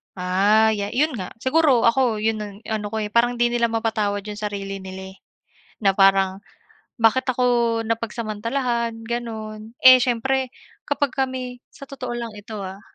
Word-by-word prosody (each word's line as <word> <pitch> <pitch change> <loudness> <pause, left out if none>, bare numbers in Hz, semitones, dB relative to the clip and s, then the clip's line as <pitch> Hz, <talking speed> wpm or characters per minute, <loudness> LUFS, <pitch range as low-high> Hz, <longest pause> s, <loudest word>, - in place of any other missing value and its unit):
Ah, 200 +4 +3
ya 200 -1 -2
'yon 305 +5 +2
nga 185 -2 -6
siguro 270 -3 +3
ako 230 -2 +2
'yon 220 0 0
ang 205 -1 -7
ano 215 -1 -2
ko 220 +1 -3
eh, 210 - -5
parang 240 +2 +3
'di 240 0 +2
nila 235 -1 +2
mapatawad 215 -3 -1
'yong 210 0 -7
sarili 200 -2 -4
nila 190 0 -8
eh, 190 - -18 0.6
na 195 -3 +2
parang 195 0 +3 0.5
bakit 230 +3 +2
ako 250 0 +1 0.4
napagsamantalahan 230 +2 -2
gano'n. 225 -1 -6
Eh 255 0 +10
siyempre, 255 +2 0 0.4
kapag 285 -2 0
kami 255 -2 -3
sa 275 - -12
totoo 265 -2 -7
lang 235 -2 -5
ito, 210 +1 -9
ah, 190 +1 -8
225 Hz, 160 wpm, -22 LUFS, 205-245 Hz, 0.6 s, Eh